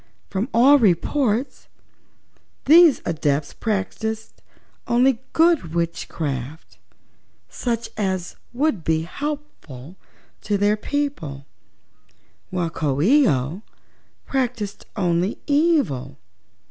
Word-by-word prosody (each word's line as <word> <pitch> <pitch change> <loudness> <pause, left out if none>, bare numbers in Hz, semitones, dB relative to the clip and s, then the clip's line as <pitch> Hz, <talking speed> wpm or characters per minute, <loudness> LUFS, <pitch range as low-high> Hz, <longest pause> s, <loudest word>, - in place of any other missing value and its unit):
Moreover, - - -36 0.2
from 200 +6 -2
all 270 +5 +6
reports 230 - 0 1.0
these 320 0 +6
Adepts 150 -3 -1
practiced 220 +1 -4 0.5
only 245 0 +3
good 320 - +2
witchcraft, 155 -4 -4 0.7
such 235 -2 -3
as 190 -4 -2 0.2
would 250 - 0
be 160 0 +1
helpful 185 - -7 0.4
to 205 -1 -1
their 205 +1 +2
people, 210 - -4 1.0
while 175 -3 -2
Coo 145 -4 -1
ee 265 - +5
oh 140 +7 -1 0.7
performed 240 -6 -2
only 180 0 0
evil." 285 - +1
205 Hz, 90 wpm, -22 LUFS, 165-265 Hz, 1.0 s, all